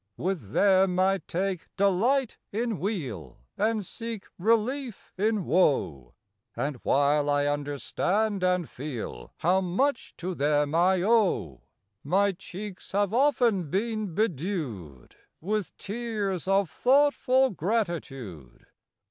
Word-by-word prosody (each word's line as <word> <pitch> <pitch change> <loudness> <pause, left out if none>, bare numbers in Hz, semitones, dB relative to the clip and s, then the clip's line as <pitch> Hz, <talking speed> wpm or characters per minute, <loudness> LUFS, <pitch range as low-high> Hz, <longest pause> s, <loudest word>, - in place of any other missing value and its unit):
With 170 - -3
them 190 -2 +4
I 190 +1 +3
take 185 0 -2
delight 215 +7 +2
in 225 -1 -2
weal 130 - -4 0.2
And 215 -1 0
seek 230 +1 -6
relief 230 +4 0
in 210 -1 0
woe; 85 - +1 0.4
And 140 -2 -2
while 145 +3 +2
I 145 0 +2
understand 145 +8 -1
and 180 -3 +1
feel 125 - -7
How 185 +4 +2
much 230 +9 -1
to 185 +2 -4
them 145 -1 +1
I 180 +2 +3
owe, 195 - +2 0.4
My 200 +7 +2
cheeks 195 +1 -9
have 205 0 +1
often 240 - +2
been 215 -1 -2
bedew'd 145 - -3 0.2
With 205 0 -3
tears 205 -5 -3
of 195 0 +3
thoughtful 265 - +3
gratitude. 150 - -4
190 Hz, 110 wpm, -27 LUFS, 150-215 Hz, 0.4 s, them